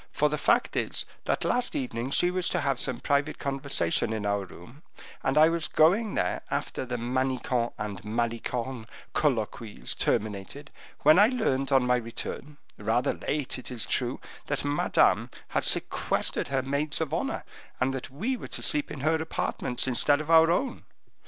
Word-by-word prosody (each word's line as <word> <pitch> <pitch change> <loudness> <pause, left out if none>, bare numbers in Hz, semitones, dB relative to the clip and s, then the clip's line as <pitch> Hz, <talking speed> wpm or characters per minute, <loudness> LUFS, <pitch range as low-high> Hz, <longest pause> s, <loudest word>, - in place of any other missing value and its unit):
For, - - +2
the - - -1
fact - - +2
is, - - -1 0.2
that - - 0
last 245 0 0
evening 125 -1 -3
she 175 +5 +3
wished 180 -1 0
to - - +1
have 135 -2 0
some 130 -3 -1
private 145 +1 0
conversation 135 - 0
in 110 -2 -3
our 100 -1 0
room, 105 - -14 0.4
and 135 +1 0
I 155 +1 +8
was 165 -2 -1
going 195 +7 +3
there - - 0
after 130 - -3
the 125 0 -2
Manicamp 125 0 -1
and 105 -3 -5
Malicorne 115 +2 -3 0.3
colloquies 115 -5 -1
terminated, 105 +8 -2 0.3
when 155 +5 +6
I 205 - +8
learned, 145 - 0
on 135 -2 +4
my 125 0 +3
return, 125 +5 -6 0.2
rather 110 +4 +1
late, 140 -3 -3
it - - -8
is 125 -3 -1
true, 125 0 -1 0.3
that - - -2
Madame 145 +1 +2 0.2
had - - 0
sequestered - - +1
her 135 0 -1
maids 140 +3 0
of 160 -3 -2
honor, - - -2 0.4
and 130 +1 +1
that 130 - -5
we 215 - -2
were - - -8
to - - -6
sleep 295 -1 +2
in 135 - -7
her 155 +3 +2
apartments, 140 -5 -1
instead 140 +3 +4
of 155 +1 -3
our 165 0 +7
own. 260 +10 -1
135 Hz, 170 wpm, -28 LUFS, 120-155 Hz, 0.4 s, I